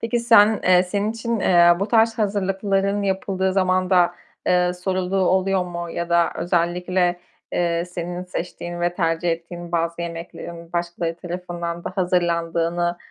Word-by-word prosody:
Peki 235 +1 -1
sen, 220 -2 +5
eee, 180 0 +5
senin 205 +3 -1
için, 230 -1 -2
eee, 175 -2 +5
bu 200 - -1
tarz 225 0 +3
hazırlıkların 200 -1 0
yapıldığı 190 -1 -1
zamanda, 185 -2 +2 0.3
eee, 180 0 +3
sorulduğu 185 +1 -2
oluyor 190 0 +2
mu? 175 -1 -6
Ya 170 +1 -4
da 170 0 +3
özellikle, 175 +1 0 0.3
eee, 170 -1 0
senin 175 0 -5
seçtiğin 175 -1 -6
ve 175 0 0
tercih 165 0 0
ettiğin 170 +1 -6
bazı 170 0 -1
yemeklerin 170 0 -8
başkaları 170 -1 -2
tarafından 175 -1 -5
da - - -3
hazırlandığını 175 -1 0
180 Hz, 135 wpm, -22 LUFS, 170-190 Hz, 0.3 s, sen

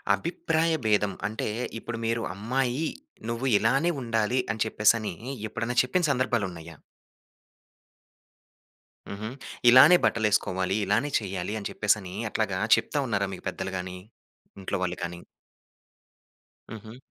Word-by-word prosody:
అభిప్రాయ 165 - 0
భేదం 105 -2 +2
అంటే, 110 +2 -4 0.3
ఇప్పుడు 115 0 -6
మీరు 115 0 0
అమ్మాయి, 130 +8 -1 0.4
నువ్వు 115 +3 -3
ఇలానే 135 +11 +2
ఉండాలి 115 +1 0
అని 110 - 0
చెప్పేసనీ 110 -1 +2 0.4
ఎప్పుడన్నా 115 +3 -3
చెప్పిన 175 +8 0
సందర్భాలున్నయ్యా? 95 - -2 2.3
హుహు. 105 +2 -5 0.4
ఇలానే 135 +8 +9
బట్టలేసుకోవాలి, 100 -4 +1
ఇలానే 115 +9 +1
చెయ్యాలి 95 -1 -4
అని 100 - -5
చెప్పేసనీ, 105 -3 0 0.2
అట్లాగా 100 -4 -1 0.2
చెప్తా 145 - -2
ఉన్నారా 100 -3 0
మీకు - - -10
పెద్దలు 95 0 -5
గానీ, 90 0 -6 0.6
ఇంట్లో 95 - -2
వాళ్ళు 90 0 -2
కానీ? 85 0 -5 1.5
హుహు. 110 +1 -9
110 Hz, 110 wpm, -27 LUFS, 100-125 Hz, 2.3 s, ఇలానే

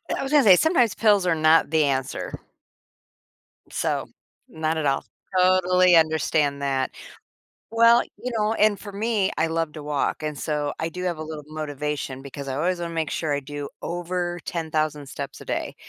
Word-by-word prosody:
I - - -3
was 270 - -4
gonna 295 -2 +6
say, 195 -4 +8
sometimes 245 - +3
pills 205 -4 +3
are 175 - +3
not 155 0 +4
the 160 -1 +4
answer. 135 -2 -2 1.4
So, - - -1 0.4
not 160 0 -2
at 155 - -1
all. 135 -1 +1 0.3
Totally 185 -1 +5
understand 155 -3 +2
that. 135 -2 0 0.8
Well, 230 +1 +6 0.2
you 250 - -4
know 210 0 +1
and 210 -2 +3
for 205 - -9
me, 210 -1 0
I 160 - +1
love 165 -1 -1
to 155 - -8
walk, 145 +1 -1
and 150 -2 -4
so, 150 -1 -2
I 160 - -1
do 180 +2 -7
have 175 -3 -1
a - - -4
little 155 -1 -7
motivation 150 -3 -4
because 140 0 -8
I 130 - -2
always 175 +6 0
wanna 170 -1 -4
make 160 -2 -1
sure 155 -3 -1
I - - 0
do 145 0 -6
over 175 0 -3
10,000 155 -3 -2
steps - - -7
a - - -10
day. - - -3
160 Hz, 180 wpm, -24 LUFS, 150-185 Hz, 1.4 s, say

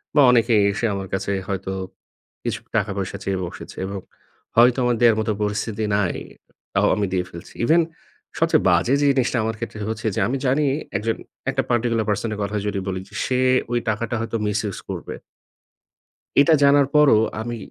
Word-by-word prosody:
বা, 145 - +7
অনেকেই 115 -3 +4
এসে 105 +4 -2
আমার 95 -1 -4
কাছে 95 +1 -1 0.2
হয়তো 95 -1 -3 0.7
কিছু - - -2 0.2
টাকা 105 -2 +1
পয়সা 100 0 -3
চেয়ে 95 -1 -1
বসেছে। - - -9
এবং 100 0 -4 0.6
হয়তো 120 +2 +6
আমার 120 -1 +2
দেয়ার 115 -2 +6
মত 110 +1 -1
পরিস্থিতি 105 +1 -2
নাই, 100 -4 0 0.6
তাও - - +3
আমি 105 - 0
দিয়ে 90 -1 +1
ফেলছি। 85 +1 -11
ইভেন 165 +4 +5 0.6
সবচেয়ে - - +3
বাজে 130 - +3
যে 145 - +3
জিনিসটা 130 -2 +1
আমার 110 0 -2
ক্ষেত্রে 115 -2 -6
হচ্ছে 110 - -5
যে, - - 0
আমি 135 +3 -1
জানি 135 +4 +2 0.3
একজন 110 +2 -1 0.3
একটা 135 0 +1
পার্টিকুলার 115 -2 +1
পারসনের 105 +1 -1
কথা 105 +1 -3
যদি 100 -1 -1
বলি, 95 -1 -2
যে - - -14
সে 130 -2 0 0.3
ঐ - - -1 0.2
টাকাটা 115 +2 -2
হয়তো 115 0 -4
মিস 105 +1 0
ইউজ 100 - -4
করবে - - -6 1.3
এটা 160 +3 +5
জানার 140 -1 +5
পরও 145 -7 +6 0.2
আমি 120 +1 -4
110 Hz, 175 wpm, -22 LUFS, 100-120 Hz, 1.3 s, বা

